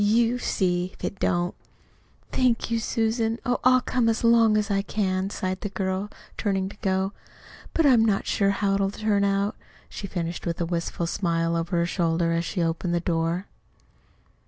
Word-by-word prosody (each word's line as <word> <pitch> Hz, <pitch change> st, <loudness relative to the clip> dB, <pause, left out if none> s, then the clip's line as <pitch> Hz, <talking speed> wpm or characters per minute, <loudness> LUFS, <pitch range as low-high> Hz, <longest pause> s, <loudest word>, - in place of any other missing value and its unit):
You 230 Hz, +3 st, +3 dB
see 180 Hz, -5 st, 0 dB
if -, -, -18 dB
it 200 Hz, -, -3 dB
don't." 175 Hz, 0 st, +1 dB, 0.8 s
"Thank 240 Hz, -2 st, +1 dB
you, 230 Hz, -, +2 dB
Susan. 225 Hz, 0 st, 0 dB
Oh, 245 Hz, 0 st, +1 dB
I'll 255 Hz, 0 st, +5 dB
come 245 Hz, -2 st, +1 dB
as 225 Hz, +1 st, 0 dB
long 230 Hz, -2 st, +5 dB
as 210 Hz, 0 st, 0 dB
I 195 Hz, 0 st, +2 dB
can," 190 Hz, -2 st, -1 dB
sighed 185 Hz, -1 st, -3 dB
the 205 Hz, -, -3 dB
girl, 190 Hz, 0 st, -2 dB, 0.3 s
turning 195 Hz, -2 st, 0 dB
to 205 Hz, -, -13 dB
go. 190 Hz, 0 st, 0 dB, 0.6 s
"But 325 Hz, -, +3 dB
I'm 250 Hz, -5 st, +6 dB
not 210 Hz, -3 st, +1 dB
so -, -, -2 dB
sure 200 Hz, -1 st, +2 dB
how 200 Hz, 0 st, +1 dB
it'll 195 Hz, 0 st, +1 dB
turn 205 Hz, 0 st, 0 dB
out," 200 Hz, +1 st, +1 dB, 0.3 s
she 200 Hz, -, -6 dB
finished 175 Hz, -2 st, -4 dB
with 170 Hz, -, -2 dB
a 170 Hz, -, 0 dB
wistful 170 Hz, 0 st, -2 dB
smile 170 Hz, -1 st, 0 dB
over 170 Hz, +1 st, -1 dB
her 170 Hz, -, +2 dB
shoulder 170 Hz, -1 st, +1 dB
as 165 Hz, 0 st, 0 dB
she 180 Hz, -2 st, -1 dB
opened 170 Hz, +1 st, -1 dB
the -, -, +2 dB
door. 170 Hz, +2 st, -1 dB
195 Hz, 185 wpm, -25 LUFS, 175-220 Hz, 0.8 s, I'm